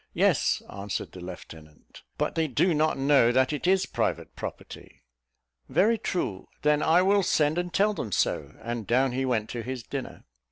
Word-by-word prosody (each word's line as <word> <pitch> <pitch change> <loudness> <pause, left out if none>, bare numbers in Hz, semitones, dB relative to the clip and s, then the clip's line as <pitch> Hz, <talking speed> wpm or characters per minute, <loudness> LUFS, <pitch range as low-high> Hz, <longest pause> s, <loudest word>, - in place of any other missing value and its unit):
"Yes," - - +2
answered 100 0 -5
the 95 - -11
lieutenant; 80 -4 -12 0.2
"but - - -1
they 160 -1 0
do 160 +7 +2
not 155 0 +1
know 135 -3 +4
that 130 +3 +2
it 150 +4 -3
is 190 0 +3
private - - -2
property." - - -9 0.7
"Very 225 +3 +3
true: 105 - -3 0.2
then 150 0 +3
I 170 +4 +4
will 200 +1 +4
send 155 -2 +2
and 175 0 -3
tell 210 +4 +2
them 110 - -5
so;" - - -1
and 115 -2 -4
down 130 +2 +2
he 130 +2 -1
went 115 -4 0
to 120 - -4
his 125 0 -5
dinner. 135 +2 -6
135 Hz, 175 wpm, -27 LUFS, 115-170 Hz, 0.7 s, know